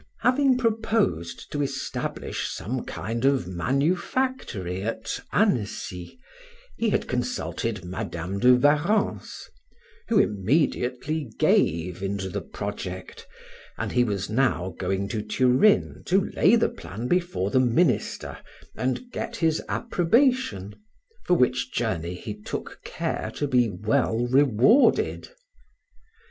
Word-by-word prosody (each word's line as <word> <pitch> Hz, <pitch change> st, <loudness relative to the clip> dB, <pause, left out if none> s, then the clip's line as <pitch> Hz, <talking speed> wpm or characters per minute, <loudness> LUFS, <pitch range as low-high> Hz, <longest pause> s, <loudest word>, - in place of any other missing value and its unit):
Having 260 Hz, 0 st, +3 dB
proposed 220 Hz, -, -1 dB
to 145 Hz, -, -1 dB
establish 135 Hz, -1 st, -3 dB
some 125 Hz, +4 st, -4 dB
kind 115 Hz, +4 st, -4 dB
of 135 Hz, -8 st, +2 dB
manufactory 135 Hz, -, -1 dB
at 110 Hz, +1 st, -3 dB
Annecy, 105 Hz, -, -1 dB, 0.6 s
he 230 Hz, -, 0 dB
had -, -, 0 dB
consulted 115 Hz, -4 st, -3 dB
Madam 90 Hz, +1 st, -4 dB
de 125 Hz, +2 st, +6 dB
Warrens, 150 Hz, -, +1 dB, 0.6 s
who 230 Hz, -, +2 dB
immediately 130 Hz, -, 0 dB
gave 85 Hz, +3 st, +2 dB
into 100 Hz, -1 st, -3 dB
the -, -, -3 dB
project, -, -, -7 dB, 0.5 s
and -, -, -3 dB
he 125 Hz, -, +3 dB
was 100 Hz, -4 st, -2 dB
now 110 Hz, -7 st, 0 dB
going 95 Hz, +1 st, -1 dB
to 110 Hz, 0 st, -2 dB
Turin 130 Hz, -, +3 dB
to 190 Hz, +2 st, +2 dB
lay 215 Hz, -, +4 dB
the 230 Hz, -, +2 dB
plan 110 Hz, +6 st, -7 dB
before 175 Hz, -, 0 dB
the 130 Hz, -, +4 dB
minister 130 Hz, +4 st, +1 dB, 0.4 s
and 130 Hz, -, -2 dB
get 235 Hz, -, -4 dB
his 160 Hz, -6 st, +1 dB
approbation, 230 Hz, -, +1 dB, 0.5 s
for 180 Hz, -, +3 dB
which 125 Hz, -3 st, +1 dB
journey 90 Hz, -7 st, -2 dB
he 105 Hz, +4 st, -6 dB
took 105 Hz, 0 st, -7 dB
care -, -, -3 dB
to 145 Hz, -, -1 dB
be 125 Hz, -4 st, +3 dB
well 110 Hz, +4 st, 0 dB
rewarded. 135 Hz, -, +3 dB
125 Hz, 115 wpm, -25 LUFS, -, 0.6 s, de